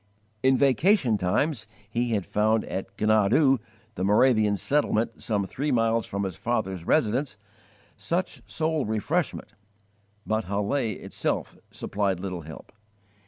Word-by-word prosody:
In 130 +1 +4
vacation 140 - +3
times 110 - 0 0.2
he 120 +2 -1
had 100 -4 -2
found 110 +1 +1
at 95 - -4
Gnadau, 110 +6 +4 0.3
the 95 - -4
Moravian 105 0 +4
settlement 135 -3 0
some 105 -3 0
three 140 +9 -3
miles 115 -2 +1
from 100 +1 -3
his 95 -3 -3
father's 95 -7 -2
residence, 125 -3 +1 0.6
such 175 +2 -2
soul 160 -2 0
refreshment, 120 - -1 0.8
but 110 0 -1
Halle 100 +3 -1 0.2
itself - - -3
supplied 100 -3 -2
little 90 -2 -4
help. 80 +1 -11
110 Hz, 120 wpm, -26 LUFS, 100-135 Hz, 0.8 s, In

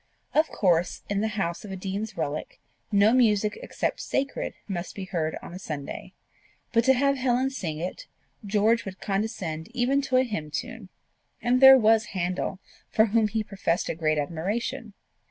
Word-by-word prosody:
Of 315 +1 +4
course, 175 -3 +1
in 200 0 +1
the 220 - +1
house 170 -4 -2
of 205 - -8
a - - -4
dean's 195 +3 -4
relict, 150 -2 -3 0.3
no 205 +2 +5
music 210 -4 +3
except - - -2
sacred 275 0 -2
must 180 -3 -4
be 195 - -5
heard 165 -5 -2
on - - -9
a 180 - -7
Sunday; 150 -6 -6 0.6
but 230 0 +4
to 265 - +6
have 275 +2 +2
Helen 255 +1 +1
sing 165 - -4
it, 180 - -5 0.4
George 215 +3 +2
would 190 -2 -8
condescend 195 -6 -3
even 260 +3 +2
to 265 -2 +1
a 255 - +5
hymn 205 -11 -4
tune; 150 - -5 0.5
and 250 +1 +2
there 265 0 +11
was 220 -1 +4
Handel, 180 +1 -1 0.3
for 220 - +4
whom 220 0 +2
he 220 +1 -1
professed 190 -4 -1
a - - 0
great 155 -1 0
admiration! 195 +8 -3
205 Hz, 175 wpm, -26 LUFS, 175-235 Hz, 0.6 s, there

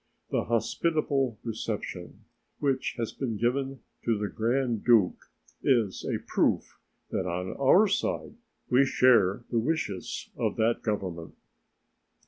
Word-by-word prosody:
The - - 0
hospitable 135 +1 0
reception 105 -5 -5 0.4
which 135 -2 0
has 115 -2 -2
been 115 -6 -3
given 135 +3 -1 0.2
to 115 -2 +1
the 105 0 -2
Grand 120 0 0
Duke 110 -7 +3 0.3
is 115 -7 +1
a - - -1
proof - - 0 0.3
that 95 - -1
on 90 +1 -3
our 185 +10 +6
side 200 - -1 0.3
we 125 +2 +5
share 120 -6 +4
the 120 - +2
wishes 115 - -3
of - - -1
that 115 +1 +1
Government. 90 -7 -3
115 Hz, 120 wpm, -28 LUFS, 105-135 Hz, 0.4 s, our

